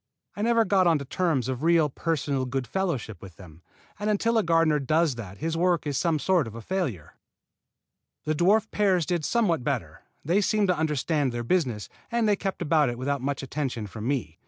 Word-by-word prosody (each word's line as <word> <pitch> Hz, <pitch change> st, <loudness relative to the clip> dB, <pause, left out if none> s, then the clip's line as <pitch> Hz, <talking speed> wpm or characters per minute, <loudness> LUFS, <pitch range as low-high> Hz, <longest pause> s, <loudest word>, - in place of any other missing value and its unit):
I 205 Hz, -, -5 dB
never 230 Hz, 0 st, +3 dB
got 190 Hz, -3 st, +3 dB
onto 155 Hz, -4 st, +2 dB
terms 155 Hz, -4 st, 0 dB
of 130 Hz, -1 st, -3 dB
real 165 Hz, -1 st, +4 dB
personal 140 Hz, -3 st, -2 dB
goodfellowship 135 Hz, -, -3 dB
with 95 Hz, -4 st, -11 dB
them; 85 Hz, -3 st, -14 dB, 0.4 s
and 210 Hz, +1 st, -1 dB
until 225 Hz, +2 st, +2 dB
a -, -, +3 dB
gardener 165 Hz, -4 st, +3 dB
does 155 Hz, +2 st, +2 dB
that 100 Hz, -5 st, -9 dB
his 160 Hz, +1 st, -2 dB
work 175 Hz, 0 st, +1 dB
is 145 Hz, -2 st, -2 dB
some 165 Hz, +3 st, +1 dB
sort 170 Hz, -3 st, +1 dB
of 110 Hz, -, -9 dB
a 115 Hz, -, -7 dB
failure. 140 Hz, -, -3 dB, 1.1 s
The 155 Hz, -, +1 dB
dwarf 200 Hz, +7 st, +2 dB
pears 190 Hz, -5 st, +2 dB
did 175 Hz, -1 st, -1 dB
somewhat 180 Hz, -, +1 dB
better. -, -, -3 dB, 0.2 s
They 180 Hz, +7 st, +2 dB
seemed 205 Hz, -1 st, +1 dB
to 180 Hz, -, +3 dB
understand 150 Hz, -2 st, 0 dB
their 120 Hz, 0 st, -4 dB
business, 125 Hz, -, 0 dB, 0.2 s
and 235 Hz, -2 st, +1 dB
they 205 Hz, -, +4 dB
kept 195 Hz, -2 st, -3 dB
about 150 Hz, -3 st, +3 dB
it 120 Hz, -, -4 dB
without 140 Hz, +2 st, -2 dB
much 140 Hz, +1 st, -2 dB
attention 135 Hz, -5 st, -3 dB
from 105 Hz, +3 st, -6 dB
me. 120 Hz, -, -2 dB
155 Hz, 195 wpm, -26 LUFS, 130-185 Hz, 1.1 s, real